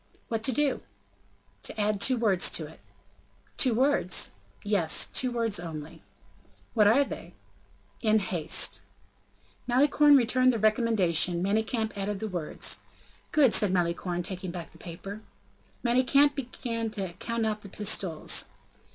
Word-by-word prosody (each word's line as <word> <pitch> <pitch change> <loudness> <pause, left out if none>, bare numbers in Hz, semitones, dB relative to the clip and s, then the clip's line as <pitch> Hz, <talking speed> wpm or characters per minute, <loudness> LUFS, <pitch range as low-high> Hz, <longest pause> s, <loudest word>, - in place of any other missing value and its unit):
"What 225 -1 -2
to 265 - +4
do?" 280 +2 0 0.8
"To 220 - -2
add 205 -1 0
two 255 +2 +4
words 205 -6 +1
to - - 0
it." - - -14 0.8
"Two 255 -5 +2
words?" 260 -7 +2 0.3
"Yes; 180 -7 +3
two 255 -1 -1
words 230 -5 -1
only." 160 -3 -8 0.7
"What 215 -3 +4
are 250 +7 +5
they?" - - -9 0.7
"In 220 -2 +3
haste." 180 -6 +1 0.9
Malicorne 285 +3 +5
returned 255 +1 +3
the - - -1
recommendation; 200 -6 +2
Manicamp 220 +3 -1
added 200 0 -3
the 220 - -4
words. 175 -6 -3 0.5
"Good," 275 -7 +4
said 205 -3 +2
Malicorne, 175 0 -1
taking 185 0 -5
back 170 -1 -8
the - - -19
paper. 195 +5 -9 0.6
Manicamp 260 +4 +3
began 235 -4 -4
to 195 -4 -5
count 230 -1 -2
out 215 -1 -2
the 200 - -11
pistoles. 190 -5 0
215 Hz, 135 wpm, -27 LUFS, 185-240 Hz, 0.9 s, are